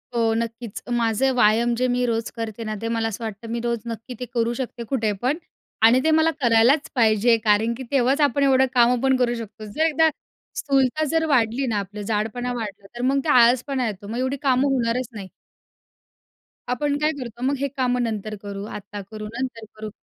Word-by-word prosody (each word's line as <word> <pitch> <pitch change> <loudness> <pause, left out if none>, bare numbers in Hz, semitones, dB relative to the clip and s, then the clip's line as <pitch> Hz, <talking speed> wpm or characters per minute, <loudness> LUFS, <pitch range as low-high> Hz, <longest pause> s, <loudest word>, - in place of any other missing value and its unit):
हो, 225 -1 +2
नक्कीच. 230 -1 -5
माझे 235 +2 +2
व्यायाम 235 0 +3
जे 255 - +3
मी 245 0 +1
रोज 230 -1 -1
करते 225 0 -4
ना 215 - -2
ते 230 - -2
मला 225 0 0
असं 230 - -6
वाटतं 220 0 -6
मी 235 - -2
रोज 235 -1 0
नक्की 230 +3 -7
ते - - -2
करू 235 0 +1
शकते 245 -2 -4
कुठे 225 -6 0
पण 265 +5 +1 0.5
आणि 245 +3 +5
ते - - +4
मला 320 +1 +3
करायलाच 240 +4 +4
पाहिजे. 230 -1 +4
कारण 215 +3 +3
की 260 - -6
तेव्हाच 270 +2 +2
आपण 280 0 -1
एवढं 265 0 +5
कामं 245 0 +4
पण 265 0 +4
करू 240 -1 +2
शकतो 220 0 -11
जर 315 - +3
एकदा 320 0 +3 0.5
स्थूलता 275 +2 +2
जर 320 0 +2
वाढली 235 +3 +1
ना 220 -3 0
आपलं 205 +2 -9
जाडपणा 225 +4 -1
वाढला. 210 -4 -6
तर - - -4
मग 275 - +2
ते - - -1
आळसपणा 250 +1 +2
येतो 205 -1 -6
मग 230 +3 -4
एवढी 270 +2 -2
कामं 270 +1 +3
होणारच 240 0 0
नाही. 200 -3 -8 1.4
आपण 285 +3 0
काय 305 +1 +2
करतो 240 -2 -8
मग 280 - +1
हे 280 +2 -1
कामं 250 -1 +1
नंतर 215 -2 -3
करू, 200 -1 -6
आता 205 -1 -7
करू, 215 -1 -7
नंतर 230 0 -5
करू, 215 0 -6
235 Hz, 200 wpm, -23 LUFS, 220-260 Hz, 1.4 s, आणि